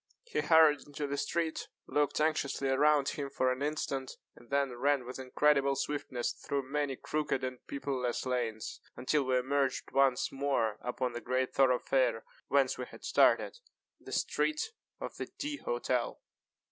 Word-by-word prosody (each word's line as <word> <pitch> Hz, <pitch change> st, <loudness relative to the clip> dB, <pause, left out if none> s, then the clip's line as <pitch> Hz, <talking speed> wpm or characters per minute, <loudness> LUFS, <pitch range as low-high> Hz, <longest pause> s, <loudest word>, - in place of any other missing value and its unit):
He 475 Hz, -, -2 dB
hurried 160 Hz, -3 st, +5 dB
into 145 Hz, 0 st, -4 dB
the 140 Hz, 0 st, -2 dB
street, 165 Hz, +2 st, -1 dB, 0.2 s
looked 145 Hz, 0 st, +1 dB
anxiously 150 Hz, -3 st, +1 dB
around 145 Hz, +1 st, +4 dB
him 140 Hz, -2 st, -4 dB
for 130 Hz, -1 st, +1 dB
an 130 Hz, +1 st, -3 dB
instant, 140 Hz, -3 st, -2 dB, 0.2 s
and 120 Hz, -, -18 dB
then 140 Hz, -1 st, +1 dB
ran 135 Hz, +1 st, +1 dB
with 125 Hz, +2 st, -7 dB
incredible 140 Hz, +1 st, +3 dB
swiftness 135 Hz, -3 st, -2 dB
through 140 Hz, -1 st, -3 dB
many 140 Hz, 0 st, -1 dB
crooked 150 Hz, -1 st, -2 dB
and 130 Hz, -1 st, -3 dB
people 140 Hz, -1 st, -3 dB
less 125 Hz, 0 st, -1 dB
lanes, 120 Hz, -4 st, -2 dB
until 140 Hz, +2 st, +1 dB
we 130 Hz, 0 st, +2 dB
emerged 135 Hz, +1 st, 0 dB
once 135 Hz, -2 st, +3 dB
more 135 Hz, -6 st, 0 dB
upon 125 Hz, 0 st, -2 dB
the 120 Hz, -, -5 dB
great 130 Hz, +1 st, -1 dB
thoroughfare 125 Hz, -2 st, +2 dB, 0.2 s
whence 135 Hz, -2 st, +2 dB
we -, -, -3 dB
had -, -, -14 dB
started -, -, +3 dB, 0.4 s
the -, -, -11 dB
street 310 Hz, +9 st, 0 dB, 0.3 s
of -, -, -6 dB
the -, -, -4 dB
D__ 295 Hz, 0 st, -3 dB
Hotel. -, -, -1 dB
135 Hz, 160 wpm, -32 LUFS, 130-145 Hz, 0.4 s, hurried